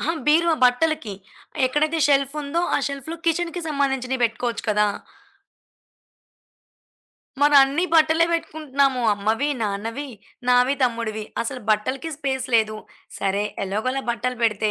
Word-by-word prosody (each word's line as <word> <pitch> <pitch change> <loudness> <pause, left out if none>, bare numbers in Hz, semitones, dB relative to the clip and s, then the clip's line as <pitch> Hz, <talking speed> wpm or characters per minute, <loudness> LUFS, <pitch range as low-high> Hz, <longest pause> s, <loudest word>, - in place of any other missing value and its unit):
అహా! 330 - 0
బీరువా 330 +2 +4
బట్టలకి. 250 -2 +1 0.5
ఎక్కడైతే 305 +5 0
షెల్ఫుందో, 285 +3 0
ఆ - - +2
షెల్ఫ్‌లో 280 +4 -6
కిచెన్‌కి 340 +1 0
సంబంధించినవి 265 -3 -1
పెట్టుకోవచ్చు 230 +1 -2
కదా. 210 0 +3 2.6
మరన్ని 285 +3 +5
బట్టలే 320 +1 +4
పెట్టుకుంటున్నాము. 280 -6 0
అమ్మవి, 220 +7 0
నాన్నవి, 225 +7 -3 0.4
నావి, 250 +2 +4
తమ్ముడివి 230 -3 -1 0.2
అసలు 250 +2 -5
బట్టలకి 255 +9 -1
స్పేస్ 265 -3 -2
లేదు. 215 -1 +2 0.4
సరే 200 +1 0 0.2
ఎలాగోలా 240 +8 -2
బట్టలు 250 +2 -2
పెడితే, 215 -1 +1
265 Hz, 105 wpm, -22 LUFS, 230-300 Hz, 2.6 s, మరన్ని